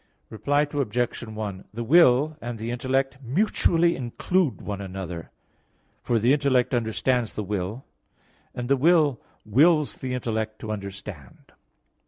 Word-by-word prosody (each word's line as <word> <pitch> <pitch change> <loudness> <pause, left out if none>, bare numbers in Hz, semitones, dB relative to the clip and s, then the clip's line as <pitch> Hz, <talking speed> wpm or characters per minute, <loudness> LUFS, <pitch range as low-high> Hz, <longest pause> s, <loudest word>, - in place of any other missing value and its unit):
Reply 145 +7 +1
Obj. 125 -5 -2
1: 105 -3 -6
The 120 - -3
will 150 +1 +5
and 120 0 -5
the 115 +2 -4
intellect 130 +2 -1
mutually 170 - +2
include 135 +6 0
one 100 -1 -5
another: 90 -3 -6 0.7
for 120 - +1
the 120 +5 +3
intellect 140 -4 +2
understands 120 0 0
the 105 - -3
will, 100 +5 -4 0.7
and 120 0 -4
the 140 +1 +3
will 150 -3 +3 0.2
wills 150 +7 +3
the 125 -1 -3
intellect 110 -3 -3
to 110 - -4
understand. 100 -7 -8
120 Hz, 130 wpm, -25 LUFS, 110-140 Hz, 0.7 s, will